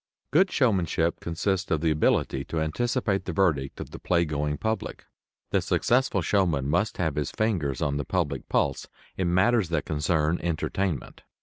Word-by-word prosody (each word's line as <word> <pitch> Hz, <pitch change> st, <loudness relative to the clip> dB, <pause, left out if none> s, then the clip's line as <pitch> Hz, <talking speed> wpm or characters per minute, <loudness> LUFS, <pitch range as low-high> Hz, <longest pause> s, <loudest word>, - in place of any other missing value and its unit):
Good 185 Hz, +7 st, +4 dB
showmanship 90 Hz, -, +1 dB
consists 95 Hz, +3 st, -1 dB
of 80 Hz, -, +1 dB
the 80 Hz, -1 st, +2 dB
ability 70 Hz, -3 st, +1 dB
to 80 Hz, -, -3 dB
anticipate 100 Hz, -, 0 dB
the 90 Hz, -, -3 dB
verdict 80 Hz, -8 st, +1 dB
of -, -, -7 dB
the -, -, -8 dB
playgoing 75 Hz, -4 st, 0 dB
public. 110 Hz, 0 st, -3 dB, 0.5 s
The -, -, +2 dB
successful 120 Hz, -6 st, +1 dB
showman 85 Hz, -8 st, +1 dB
must 90 Hz, +8 st, 0 dB
have 80 Hz, -4 st, 0 dB
his 75 Hz, -, -1 dB
fingers 85 Hz, -, -1 dB
on 70 Hz, -1 st, 0 dB
the 75 Hz, -, -1 dB
public 75 Hz, -8 st, -2 dB
pulse 70 Hz, -2 st, 0 dB, 0.3 s
in 90 Hz, -2 st, 0 dB
matters 95 Hz, +1 st, +3 dB
that 80 Hz, -3 st, -1 dB
concern 75 Hz, +1 st, 0 dB
entertainment. 85 Hz, -1 st, -2 dB
85 Hz, 160 wpm, -26 LUFS, 75-100 Hz, 0.5 s, Good